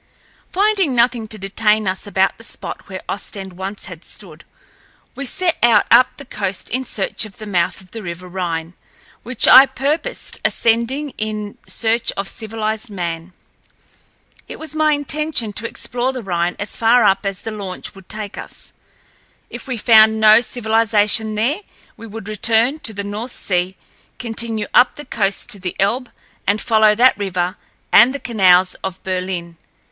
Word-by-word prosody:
Finding 390 -7 +2
nothing 235 -1 +2
to 215 - -6
detain 210 +1 +1
us 190 +2 -1
about 190 +1 +1
the - - -12
spot - - -8
where 185 -1 -7
Ostend 195 -1 -6
once 190 +3 -6
had 175 -3 -10
stood, 170 -6 -9 0.7
we 275 0 -5
set 360 +3 0
out 230 -3 +5
up 245 +2 +7
the 280 - -9
coast 200 -5 -4
in 260 +2 -1
search 200 -2 0
of 215 -3 -9
the 215 - -7
mouth 180 -4 -1
of 185 - -18
the 225 - -7
River 175 -1 -7
Rhine, 175 -2 -4 0.5
which 245 +1 +3
I 265 +2 +9
purposed 290 - -3
ascending 235 +6 +1
in 215 -1 -4
search 230 0 +1
of 195 0 -3
civilized 220 +1 -4
man. 170 -2 -5 1.1
It - - -8
was 315 -1 -5
my 310 -1 +2
intention 290 -5 -1
to 230 +3 -1
explore 245 +3 -2
the 255 -3 -6
Rhine 175 -2 -1
as 205 - -3
far 235 +1 +4
up 195 -1 +3
as 195 -1 -3
the 225 - -5
launch 195 -4 -6
would 195 -2 -16
take 210 -1 -5
us. - - -7 0.8
If - - -9
we 255 -3 -3
found 220 -1 +5
no 215 +1 +7
civilization 220 -2 +1
there 245 - 0 0.4
we 230 - -11
would 220 -1 -9
return 225 +6 +2
to 230 -7 -1
the 200 - -4
North 210 +5 -5
Sea, 180 0 0 0.4
continue 225 -2 -3
up 245 +1 +5
the 295 - -9
coast 200 -5 -2
to 200 - -7
the 180 -1 -4
Elbe, 240 +6 0 0.4
and 205 +1 +2
follow 215 -2 +4
that 245 0 +4
river 185 -2 -2 0.4
and 255 +3 +7
the - - -4
canals 185 -7 +4
of 190 -1 -6
Berlin. 180 -2 -4
215 Hz, 165 wpm, -18 LUFS, 190-240 Hz, 1.1 s, I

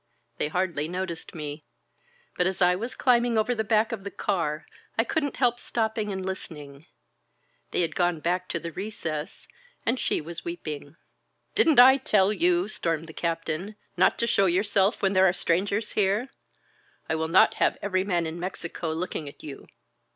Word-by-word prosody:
They - - +2
hardly 170 -2 -1
noticed 175 -1 -5
me. 150 -1 -6 0.7
But 180 - +2
as 190 0 -2
I 180 -1 +4
was 230 +7 -5
climb 245 -2 +4
ing 240 -2 0
over 220 +3 +2
the 220 -2 -1
back 220 +1 +2
of 220 -4 -5
the 200 - -4
car 165 -7 -2 0.3
I 225 - +4
couldn't 285 +2 -1
help 245 -2 +2
stopping 220 -3 -2
and 190 -1 -4
listening. 150 -5 -7 0.8
They - - 0
had 160 -2 -1
gone 175 -1 +1
back 180 +3 -1
to 170 - -2
the 165 +1 -6
recess, 165 -5 -5 0.4
and 245 +3 +1
she - - 0
was 165 +2 -7
weeping. 155 -3 -6 0.6
Didn't 325 - +5
I 260 +2 +9
tell 210 -6 +3
you," 180 -1 +2
stormed 165 -6 -2
the - - -9
Captain, 165 +4 -3 0.2
not - - +3
to 235 - +1
show 200 -4 +3
yourself 200 +4 +2
when 195 0 +3
there 190 0 +5
are - - 0
strangers 200 +5 0
here? 210 +5 +1 0.8
I - - -1
will 160 0 -1
not 170 +3 +5
have - - +3
every 185 -2 +1
man 175 -4 0
in 160 +2 -5
Mexico 170 -2 -4
looking 160 -3 -4
at - - -16
you. 145 -3 -9
185 Hz, 180 wpm, -26 LUFS, 165-215 Hz, 0.8 s, I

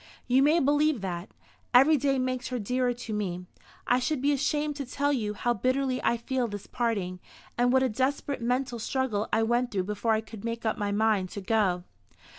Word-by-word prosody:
"You 255 +1 +3
may 305 +4 +4
believe 290 -3 +2
that. 180 -1 -4 0.5
Every 275 +5 +7
day 275 -1 +1
makes 255 0 -2
her 250 - -3
dearer 250 +3 0
to 240 -2 -6
me. 180 -4 -3 0.4
I 245 - +3
should 295 +3 -1
be 285 +3 +2
ashamed 295 +1 0
to 280 - -4
tell 285 +3 0
you 210 -5 -2
how 240 +3 0
bitterly 255 +4 0
I 235 - +2
feel 250 +1 -1
this 205 -2 -7
parting, 205 -7 -2 0.4
and 245 +1 +2
what 260 0 +4
a 260 - +2
desperate 265 +3 -1
mental 245 0 -1
struggle 225 -3 -1
I 220 +1 +3
went 240 +2 +1
through 190 -5 -1
before 210 +3 0
I 220 - +1
could 220 -2 -11
make 230 0 -4
up 220 - +1
my 205 -1 -1
mind 205 -3 +1
to - - -3
go." 190 -3 +1
245 Hz, 205 wpm, -28 LUFS, 210-265 Hz, 0.5 s, Every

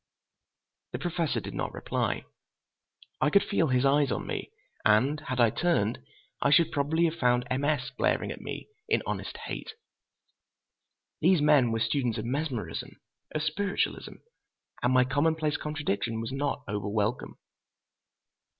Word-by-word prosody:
The - - -1
Professor 170 -3 -1
did - - -7
not - - -3
reply. - - -2 1.0
I 150 - +4
could 200 +6 +5
feel 165 -5 +1
his 130 0 +2
eyes 140 -1 +3
on - - -2
me, - - -4 0.3
and 125 +8 +4
had 130 -4 -4
I 115 -2 +5
turned, 130 -10 +1 0.4
I - - +3
should 155 +3 +5
probably 155 +4 +2
had 160 - +1
found 125 -2 +3
M. 130 +2 0
S. 140 -2 0
glaring 130 - 0
at - - -7
me - - -6 0.2
in - - +2
honest - - -4
hate. 460 - -6 1.5
These 185 -2 +4
men 145 -6 +5
were 115 - 0
students 120 -1 0
of 110 - -3
mesmerism, 130 -2 -3 0.4
of 155 - 0
spiritualism, 195 +6 -1 0.7
and 125 - +2
my 130 0 +5
commonplace 150 +3 +1
contradiction 135 -7 -2
was 115 +2 -4
not 140 +1 -2
over 105 0 -2
welcome. 110 +3 -1
140 Hz, 145 wpm, -29 LUFS, 120-155 Hz, 1.5 s, could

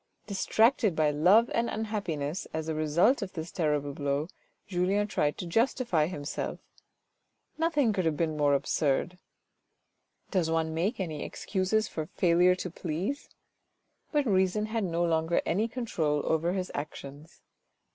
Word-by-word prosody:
Distracted 215 - +2
by 155 -1 +3
love 185 +11 +4
and 230 0 +1
unhappiness, 190 -8 -3
as 160 0 -3
a 160 - -1
result 155 - +2
of 195 -2 -5
this 165 0 -6
terrible 150 -4 0
blow, 145 +2 -1 0.4
Julien 190 +2 +1
tried 150 -8 0
to - - -5
justify 225 - +1
himself. 145 -5 -4 1.0
Nothing 295 -8 +2
could 185 -3 -1
have 160 -2 +1
been 160 -2 0
more 145 -1 +3
absurd. 145 +5 0 1.1
Does 180 -5 +1
one 160 -1 0
make 185 +9 -1
any 160 -6 -3
excuses 200 +2 -1
for 155 -1 -5
failure 180 +1 +4
to 180 -1 -5
please? 180 - -4 0.8
But 295 -2 +2
reason 190 0 +2
had 220 0 -2
no 170 -1 0
longer 165 0 +1
any 210 +6 +1
control 165 - -1
over 165 +2 +1
his 185 -1 -3
actions. 145 +2 -8
175 Hz, 140 wpm, -29 LUFS, 155-205 Hz, 1.1 s, love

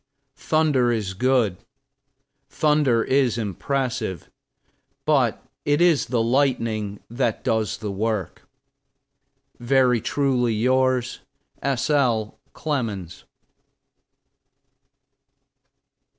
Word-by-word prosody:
Thunder 150 -6 +2
is 105 -5 -2
good, 120 -3 +1 0.9
thunder 145 -7 +2
is 130 -4 +1
impressive; 115 - -3 0.7
but - - +1 0.2
it 145 +1 +1
is 170 -4 +3
the 120 -2 0
lightning 115 -5 0
that 120 -1 -2
does 110 -1 0
the 105 -2 -5
work. 105 -2 -3 1.1
Very 125 -1 +3
truly 125 -5 0
yours, 130 +2 +1 0.4
S. 135 +1 -1
L. 120 -7 +1
CLEMENS. 110 - -4
120 Hz, 80 wpm, -23 LUFS, 110-135 Hz, 1.1 s, is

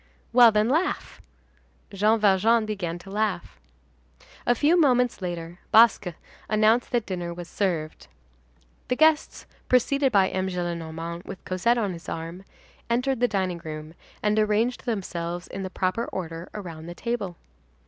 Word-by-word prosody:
"Well, 240 -2 +8
then, 210 0 +2
laugh." 320 +9 -1 0.7
Jean 215 +3 +3
Valjean 215 +3 +4
began 185 -6 -3
to 195 +2 -12
laugh. 200 - -2 0.9
A 245 - +4
few 300 +7 +3
moments 250 - +3
later, 175 -1 -5
Basque 225 -3 +6 0.4
announced 220 +3 +3
that 235 -3 +1
dinner 175 -2 -4
was 175 -1 -7
served. 170 -7 -2 0.8
The 250 - 0
guests, 315 +2 +2 0.2
preceded 270 +2 +3
by 195 -3 +4
M. 185 0 -1
Gillenormand 170 -1 -4
with 185 - -9
Cosette 200 +6 +1
on 205 -5 -1
his 165 - -9
arm, 165 +4 -6 0.4
entered 250 +2 +1
the 245 - +3
dining 190 -5 -1
room, 155 0 -7 0.3
and 210 +1 +2
arranged 215 +4 +1
themselves 175 -5 -3
in 195 - -6
the 190 - -4
proper 185 +5 -1
order 170 -2 -6
around 165 -6 -7
the 175 - -7
table. 210 -7 -3
195 Hz, 145 wpm, -25 LUFS, 175-235 Hz, 0.9 s, Well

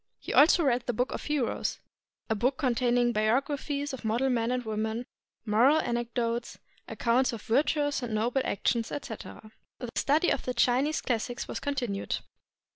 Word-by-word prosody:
He - - -6
also 330 +3 +6
read 250 -3 +1
the 245 - 0
"Book 250 +2 0
of - - -5
Heroes" 295 -6 -1 0.3
— - - -58
a 220 - +1
book 250 +5 0
containing 245 -3 +2
biographies 280 +6 0
of 265 - -7
model 235 +5 +1
men 230 -1 +1
and 250 -1 -1
women, 220 +2 -2 0.4
moral 240 +8 +4
anecdotes, 235 -2 -2 0.3
accounts 250 +2 +1
of 225 - -7
virtuous 290 +3 +1
and 235 -3 -3
noble 240 +5 +1
actions, 230 +3 0
etc. 220 -4 -7 0.3
The 245 - -6
study 305 +5 +2
of - - -1
the 250 - -3
Chinese 255 +6 +2
classics 240 0 -2
was - - -4
continued. 245 -8 -2
245 Hz, 160 wpm, -29 LUFS, 230-275 Hz, 0.4 s, also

